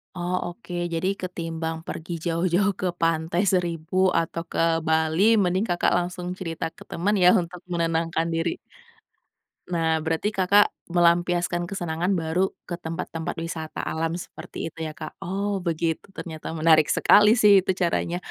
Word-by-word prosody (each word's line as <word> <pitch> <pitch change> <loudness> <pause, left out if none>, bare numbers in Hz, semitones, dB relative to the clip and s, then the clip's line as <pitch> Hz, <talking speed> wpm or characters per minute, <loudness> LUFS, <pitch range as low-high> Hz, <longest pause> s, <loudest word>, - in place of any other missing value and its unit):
Oh, 175 +1 -2 0.2
oke. 215 -6 -11 0.2
Jadi 165 +3 0
ketimbang 165 -2 -4
pergi 165 +2 -6
jauh-jauh 175 +4 +2
ke 185 - +1
pantai 165 +2 +1
Seribu 170 -2 -1 0.2
atau 165 0 -3
ke - - -2 0.3
Bali 160 +2 +2 0.2
mending 185 +4 +1
Kakak 175 - +2
langsung 180 0 -3
cerita 165 -3 -4
ke - - -12
teman 200 +5 0
ya 180 - +8
untuk 175 +1 -8
menenangkan 165 0 0
diri? 165 +1 -1 1.1
Nah, 165 -2 +1
berarti 165 +6 -1
Kakak 200 +1 +4 0.2
melampiaskan 175 0 +2
kesenangan 175 0 -1
baru 170 +3 0
ke 175 -1 -6
tempat-tempat 165 0 -5
wisata 160 -1 -5
alam 165 +1 -2
seperti 170 -1 -7
itu - - -15
ya, 155 - -8
Kak? 155 - -7
Oh, 195 +1 -2
begitu 165 -1 -2
ternyata 160 -2 -7
menarik 155 -1 +5
sekali 210 +7 +5
sih 205 -3 +6
itu 190 - 0
caranya. 175 -1 0
170 Hz, 145 wpm, -25 LUFS, 165-180 Hz, 1.1 s, ya